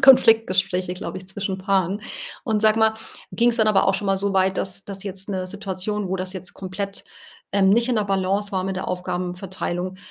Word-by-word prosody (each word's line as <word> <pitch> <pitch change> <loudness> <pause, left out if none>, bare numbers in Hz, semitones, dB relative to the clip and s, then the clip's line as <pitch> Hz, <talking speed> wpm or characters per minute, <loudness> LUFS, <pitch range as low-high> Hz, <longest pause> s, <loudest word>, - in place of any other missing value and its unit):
Konfliktgespräche, 190 -8 +5
glaube 185 - -5
ich, 185 0 -13
zwischen 195 -1 -3
Paaren. 195 0 +1 0.4
Und 220 -3 +1
sag 215 0 +5
mal, 220 0 +4 0.4
ging's 235 0 +3
dann 220 -1 +4
aber 200 -2 +4
auch 195 - +3
schon 200 +1 -2
mal 195 0 +2
so 200 0 0
weit, 190 0 +2
dass 195 +1 -2
das 200 0 -7
jetzt 195 0 -5
'ne 185 -2 -2
Situation, 200 +1 -3
wo 190 - 0
das 185 +1 -3
jetzt 185 -1 -7
komplett, 195 +1 -4 0.5
ähm, 195 -1 +4
nicht 235 +4 +4
in 245 - +2
der 210 - +2
Balance 195 +1 +1
war 185 -1 -1
mit 190 0 -2
der 185 - -3
Aufgabenverteilung, 180 0 -3
195 Hz, 200 wpm, -23 LUFS, 185-205 Hz, 0.5 s, Konfliktgespräche